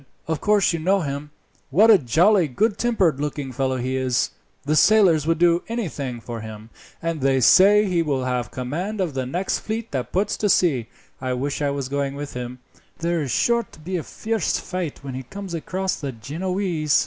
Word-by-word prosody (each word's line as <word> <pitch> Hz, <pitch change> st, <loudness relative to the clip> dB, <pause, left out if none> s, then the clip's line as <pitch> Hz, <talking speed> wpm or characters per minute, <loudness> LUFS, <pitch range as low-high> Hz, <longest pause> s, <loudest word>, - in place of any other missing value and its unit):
"Of 160 Hz, -2 st, -2 dB
course 205 Hz, -4 st, +3 dB
you 165 Hz, -, -2 dB
know 190 Hz, +4 st, +2 dB
him. 140 Hz, -1 st, -4 dB, 0.4 s
What 210 Hz, +11 st, +6 dB
a 205 Hz, -, +7 dB
jolly, 170 Hz, -, +3 dB
good 210 Hz, -, 0 dB
tempered 195 Hz, -, +2 dB
looking 145 Hz, -2 st, -3 dB
fellow 130 Hz, 0 st, -1 dB
he 130 Hz, +1 st, -2 dB
is! 130 Hz, -2 st, 0 dB, 0.3 s
The 150 Hz, +2 st, 0 dB
sailors 175 Hz, -6 st, +5 dB
would 165 Hz, 0 st, +2 dB
do 170 Hz, +1 st, +4 dB
anything 145 Hz, -, -3 dB
for 115 Hz, -1 st, -7 dB
him, 110 Hz, 0 st, -9 dB, 0.3 s
and 165 Hz, -3 st, -2 dB
they 135 Hz, 0 st, +3 dB
say 205 Hz, -, +6 dB
he 180 Hz, -4 st, +1 dB
will 140 Hz, -5 st, -1 dB
have 125 Hz, -2 st, -1 dB
command 170 Hz, +12 st, -4 dB
of 180 Hz, -6 st, -1 dB
the 130 Hz, -1 st, -2 dB
next 180 Hz, +8 st, -1 dB
fleet 225 Hz, +1 st, -4 dB
that 130 Hz, -4 st, -3 dB
puts 200 Hz, +3 st, 0 dB
to 210 Hz, -, 0 dB
sea. 140 Hz, -, +2 dB, 0.3 s
I 130 Hz, -1 st, -1 dB
wish 140 Hz, +4 st, -2 dB
I 145 Hz, -, +1 dB
was 140 Hz, -2 st, -3 dB
going 140 Hz, 0 st, -2 dB
with 145 Hz, 0 st, -6 dB
him. 125 Hz, 0 st, -6 dB, 0.4 s
There 170 Hz, 0 st, -1 dB
is 140 Hz, -, -3 dB
sure 235 Hz, -, +2 dB
to -, -, -16 dB
be 180 Hz, +4 st, -5 dB
a 175 Hz, -, -1 dB
fierce 220 Hz, +4 st, -2 dB
fight 180 Hz, -7 st, -5 dB
when 135 Hz, -2 st, -6 dB
he 130 Hz, -, -4 dB
comes 195 Hz, +7 st, -8 dB
across 185 Hz, +3 st, -2 dB
the 140 Hz, -2 st, -4 dB
Genoese. 160 Hz, -, -1 dB
155 Hz, 200 wpm, -23 LUFS, 130-190 Hz, 0.4 s, a